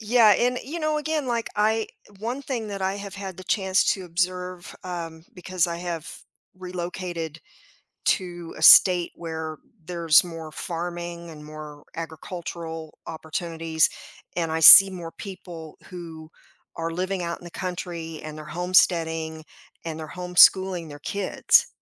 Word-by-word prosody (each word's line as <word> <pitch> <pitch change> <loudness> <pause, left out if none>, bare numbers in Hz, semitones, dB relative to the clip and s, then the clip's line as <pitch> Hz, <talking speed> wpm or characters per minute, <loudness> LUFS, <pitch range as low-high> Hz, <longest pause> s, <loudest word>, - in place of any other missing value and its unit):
Yeah 220 -1 +5
and 250 +1 +1
you 320 +5 -5
know 310 -1 0
again 305 -2 -2
like 235 -2 -1
I 220 +1 +2 0.3
one 240 +6 -4
thing 240 -6 -4
that 200 -1 -5
I 190 +1 0
have 200 -1 -8
had 195 -2 -7
the 185 - -10
chance 190 -1 +2
to 190 - -8
observe, 180 0 -3
um, 165 -3 -6
because 180 -1 -1
I 170 -1 -4
have 170 -2 -5 0.5
relocated 175 -3 -5 0.7
to 175 -4 -1
a - - -9
state 175 +1 +8
where 160 -2 -6 0.3
there's 170 -2 +4
more 165 -3 -8
farming 170 0 -5
and 150 -2 -11
more 150 -1 -10
agricultural 165 0 -7
opportunities 160 0 -1 0.5
and 165 -2 -1
I 160 - -1
see 195 +5 +12
more 175 -3 -7
people 175 -5 -9
who 165 -4 -9 0.5
are 165 0 -3
living 185 +2 -2
out 170 0 -4
in - - -17
the 175 - -9
country 170 -3 -5
and 155 0 -7
they're 155 - -9
homesteading 165 -2 +1 0.4
and 160 -1 -5
they're 155 - -6
homeschooling 180 0 +4
their 145 0 -10
kids. 200 +6 +2
175 Hz, 145 wpm, -24 LUFS, 160-190 Hz, 0.7 s, see